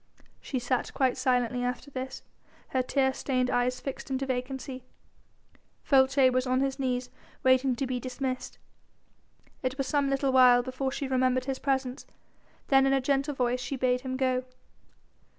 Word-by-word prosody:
She 265 - -4
sat 250 0 -1
quite 260 -2 +2
silently 250 -1 +1
after 250 +3 -3
this, 260 0 -6 0.5
her 260 - +1
tear 265 +1 +1
stained 255 -2 -1
eyes 250 +1 +1
fixed 275 - -6
into 270 0 -1
vacancy. 260 0 -4 1.0
Folces 265 -1 +5
was 255 +1 +1
on 255 +1 +2
his 275 0 -1
knees 250 -1 -2 0.3
waiting 260 0 +4
to 275 - -2
be 255 -1 -2
dismissed. 255 +1 -4 1.0
It 255 0 -2
was 275 - -1
some 285 0 +1
little 275 0 +1
while 250 -2 +6
before 260 +1 -3
she 275 - -3
remembered 255 -1 +1
his 270 -1 -3
presence, 265 -2 -2 0.6
then 270 -1 +5
in 270 - +3
a 270 - +3
gentle 275 +2 0
voice 250 -1 0
she 250 +3 -3
bade 250 -1 +1
him 260 0 -4
go. 255 -1 +1
260 Hz, 160 wpm, -28 LUFS, 250-270 Hz, 1.0 s, while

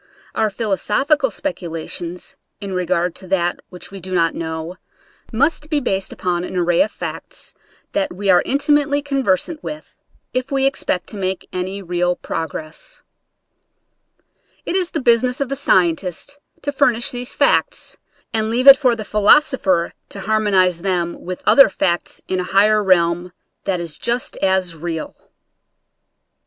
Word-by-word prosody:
Our 220 -1 +1
philosophical 235 - +1
speculations 175 - -5 0.2
in 200 -1 -5
regard 180 -1 0
to 190 - -11
that 175 -2 0
which 180 +1 -10
we 195 - -8
do 185 +1 -5
not 165 -2 +2
know 160 +2 -5 0.5
must 295 +5 +1
be 300 -2 +2
based 195 -8 -2
upon 175 -1 -2
an 180 - -5
array 175 -1 +3
of 215 - +2
facts - - -7 0.4
that 295 -1 -1
we 200 +2 -5
are 180 -2 +6
intimately 285 +1 +2
con 275 -2 -1
versant 245 - 0
with, 305 0 -8 0.4
if 255 +2 -2
we 270 -1 +2
expect 185 -9 0
to 210 - -6
make 190 -1 -3
any 190 +2 -3
real 175 0 0
progress 165 - -6 1.6
It - - -2
is 365 -2 +1
the 315 - -3
business 245 +1 +3
of 275 -2 -1
the 275 - -1
scientist 185 - 0 0.2
to 285 - -1
fur 280 -1 +4
nish 230 +1 -1
these 245 0 -5
facts, - - +1 0.4
and 220 -1 0
leave 245 +3 0
it 275 -1 +11
for 255 -4 +2
the 215 -2 -6
philos 210 +10 +5
opher 185 -9 +1 0.2
to 200 - -8
harmonize 190 -5 +2
them 175 -2 -1
with 180 0 -6
other 275 - +7
facts 175 -2 -2
in 185 - -1
a - - 0
higher 210 +1 +5
realm 175 -1 +2 0.3
that 190 -3 0
is 170 -3 -5
jusi; 240 +2 -2
as 190 -3 +1
real. 165 0 -5
195 Hz, 155 wpm, -20 LUFS, 175-255 Hz, 1.6 s, it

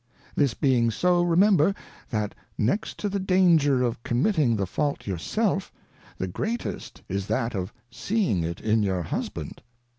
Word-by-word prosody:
This 140 -5 +2
being 125 -5 +2
so, 175 +9 +2
remember. 175 +1 +4 0.3
That 105 -3 -2 0.2
next 130 - 0
to 210 - -2
the 200 0 -1
danger 170 -8 +4
of 120 -2 -1
committing 130 - +2
the 100 -2 0
Fault 145 - -2
your 95 -4 -3
self, 195 - -1 0.5
the 95 - -2
greatest 220 - -4
is 100 +1 -3
that 115 +2 -1
of 95 0 -3 0.2
seeing 190 - 0
it 85 +1 -3
in 110 0 +2
your 95 -3 0
Husband. - - -5
130 Hz, 150 wpm, -26 LUFS, -, 0.5 s, remember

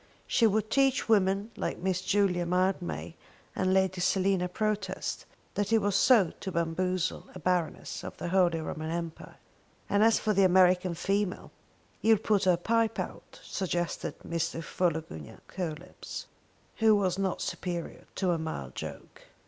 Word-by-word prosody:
She 230 - +3
would 215 +1 0
teach 270 -1 +2
women 200 0 +2
like - - -3
Miss 185 0 -1
Julia 185 -2 +2
Mildmay 170 - -1 0.4
and 185 - +1
Lady 190 -1 +2
Selina 185 0 +2
Protest 200 -1 -2 0.3
what 205 0 -1
it 225 - +6
was 205 -2 +2 0.3
to 190 - -5
bamboozle 180 +2 -1
a - - -7
Baroness 175 0 -1
of - - -7
the 175 - -4
Holy 175 -3 +3
Roman 155 0 -4
Empire! 170 -1 -5 0.5
And 205 +1 +3
as 225 0 +5
for 215 - 0
the 200 - +3
American 185 -1 +4
female. 195 +2 -1 0.5
"You'll 225 0 +5
put 205 -1 +1
her 180 -2 +4
pipe 225 +4 +1
out," - - -7
suggested 175 -2 -3
Mr. 165 0 -2
Philogunac 160 - -3
Coelebs, 175 -1 -6 0.5
who 220 -1 +5
was 195 -2 0
not 190 -2 -1
superior 175 -2 -4
to 185 -2 +1
a 170 - 0
mild 70 - -5
joke. - - -8
185 Hz, 145 wpm, -29 LUFS, 170-200 Hz, 0.5 s, it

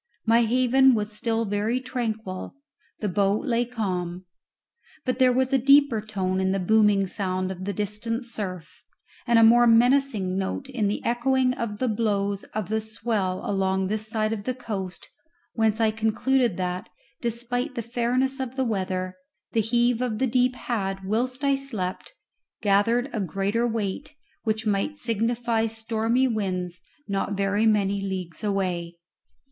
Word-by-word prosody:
My 230 +1 +5
haven 255 +2 +4
was 210 -1 -2
still 225 +1 -1
very 210 +4 0
tranquil 225 -7 -4 0.5
the 210 - 0
boat 200 +4 +1
lay 240 -2 +1
calm; 185 -6 -3 0.8
but 255 -1 -1
there 255 -1 +6
was 260 +2 +1
a 270 - +5
deeper 275 -3 +5
tone 190 -3 -2
in 190 0 +1
the 195 - 0
booming 210 0 +4
sound 185 -1 -2
of 185 0 -6
the 200 - -1
distant 210 +5 -3
surf, 185 -8 -6 0.4
and 235 -1 +4
a 230 - +7
more 240 +2 +7
menacing 230 -5 +3
note 195 +8 -3
in 245 -6 -1
the 205 - -3
echoing 255 +2 +2
of 230 -4 -4
the 255 - 0
blows 205 -3 0
of 215 -3 -4
the 220 0 0
swell 215 -4 -2
along 190 -1 +1
this 215 +2 -2
side 215 0 0
of 205 -2 -5
the 255 - -1
coast, 195 -7 -6 0.5
whence 220 -1 +1
I 220 -1 +3
concluded 225 +1 +1
that, 180 0 -3 0.3
despite 245 +3 -1
the 235 - -3
fairness 250 +3 0
of 260 -1 -4
the 265 -1 0
weather, 185 -4 -2 0.3
the 225 - +2
heave 240 +2 +2
of 240 -4 -1
the 265 - +1
deep 250 +1 +2
had, 195 -6 -3
whilst 250 +7 -1
I 280 0 +3
slept, 230 -10 -4 0.5
gathered 220 +5 +3
a 225 - -1
greater 195 +5 0
weight, 225 +6 -3 0.3
which 220 0 -1
might 210 +8 0
signify 230 -1 0
stormy 225 +3 0
winds 185 -6 -2 0.3
not 200 0 -2
very 200 +3 +2
many 200 -2 +2
leagues 190 -2 -5
away. 180 -4 -1
220 Hz, 155 wpm, -25 LUFS, 195-240 Hz, 0.8 s, a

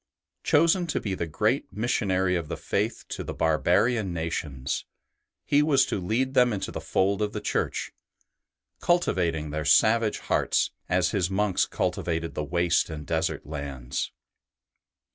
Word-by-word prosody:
Chosen 170 +4 +3
to 155 - -1
be 100 - -3
the 85 -3 -3
great 80 - 0
missionary 95 -4 0
of 85 -3 -2
the - - -4
Faith - - -2
to - - -4
the - - -6
barbarian 90 +6 +2
nations, 80 -5 -3 0.6
he 145 0 +4
was 145 -3 +4
to - - -2
lead 125 +8 0
them 125 -2 +4
into 100 -3 -3
the - - -5
fold 100 +2 +1
of 105 0 -1
the 105 - -3
Church, 105 - -2 0.9
cultivating 85 - +1
their 75 +1 -2
savage 110 +8 +4
hearts - - +1 0.2
as 90 +1 +2
his 95 -4 0
monks 95 0 +1
cultivated 85 -1 -2
the 75 - -3
waste 85 +4 +1
and 75 -2 -6
desert 80 +2 -1
lands. 70 -4 -4
90 Hz, 145 wpm, -26 LUFS, 80-110 Hz, 0.9 s, he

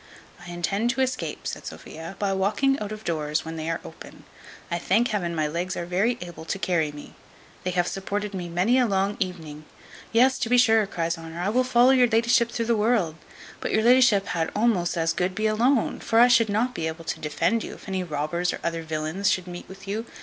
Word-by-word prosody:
"I 180 - -10
intend 195 +6 -1
to 265 +2 0
escape," 260 -1 -2
said - - -5
Sophia, 165 +4 -8
"by 200 -1 0
walking 215 +9 +1
out 210 0 -5
of 215 0 -6
the - - -21
doors 155 -2 -1
when 160 0 -6
they 160 0 -4
are 165 - -1
open. - - -12 0.5
I 170 - 0
thank 220 +8 +2
Heaven 175 -6 -2
my 155 -1 0
legs 175 +4 -3
are 175 - -3
very 195 +8 +1
able 175 -2 -8
to 165 - -3
carry 170 -6 0
me. 145 0 -11 0.5
They 185 - -1
have 175 -1 +1
supported 205 +1 -3
me 180 -2 -5
many 190 +10 +2
a 250 - +3
long 195 0 0
evening" 160 -5 -5 0.5
"Yes, 255 +3 +4
to 230 - -1
be 245 - +4
sure," 225 -4 +4
cries 165 -2 -2
Honour, 165 +1 -8
"I 180 +3 0
will 250 +4 +2
follow 250 0 +5
your 255 -2 +5
la'ship 235 +1 +3
through 230 0 -2
the 235 0 +2
world; 210 -6 +1 0.5
but - - -3
your 220 - +2
la'ship 240 -5 +5
had 165 -2 -1
almost 205 -6 +1
as 165 0 +1
good 180 +2 -1
be 215 - -1
alone: 230 +4 +2
for 225 - +1
I 240 - +8
should 230 -3 +4
not 230 +5 0
be 160 -6 -3
able 160 +1 -6
to - - -3
defend 165 +9 0
you, - - -7
if - - -15
any 190 -1 -2
robbers, 165 +2 -1
or - - -6
other 165 -1 -2
villains, 160 +4 -1
should 185 - 0
meet 175 -1 -9
with 195 +1 -12
you. 220 +4 -3
195 Hz, 230 wpm, -25 LUFS, 170-230 Hz, 0.5 s, I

